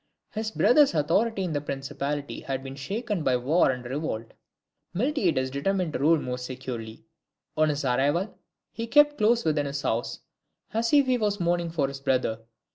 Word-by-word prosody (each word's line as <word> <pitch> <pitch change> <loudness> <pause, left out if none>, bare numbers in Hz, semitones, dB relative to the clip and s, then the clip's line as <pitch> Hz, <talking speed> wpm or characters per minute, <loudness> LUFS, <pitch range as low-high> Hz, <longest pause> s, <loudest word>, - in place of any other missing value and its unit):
His 220 0 -3
brother's 270 - +4
authority 195 +8 +1
in 175 -3 -2
the 145 - -1
principality 140 +1 -4
had 135 -1 -4
been 135 0 -7
shaken 205 - -3
by 130 -3 +3
war 140 +8 +3
and 125 -1 -3
revolt: 125 -4 -4 0.6
Miltiades 185 - +1
determined 170 +4 -1
to - - -2
rule 155 +3 +4
more 125 -2 -4
securely. 125 +1 -7 0.5
On 155 0 +3
his 145 -1 -2
arrival 145 - +1 0.4
he 230 +1 -5
kept 295 +4 +5
close 230 +1 +3
within 150 -2 +1
his 140 0 -4
house, 115 +2 -2 0.5
as 230 +1 0
if 285 -2 +5
he 255 -1 +1
was 205 -2 0
mourning 175 -1 0
for 155 -4 0
his 140 0 -7
brother. 130 -4 0
150 Hz, 170 wpm, -26 LUFS, 135-205 Hz, 0.6 s, kept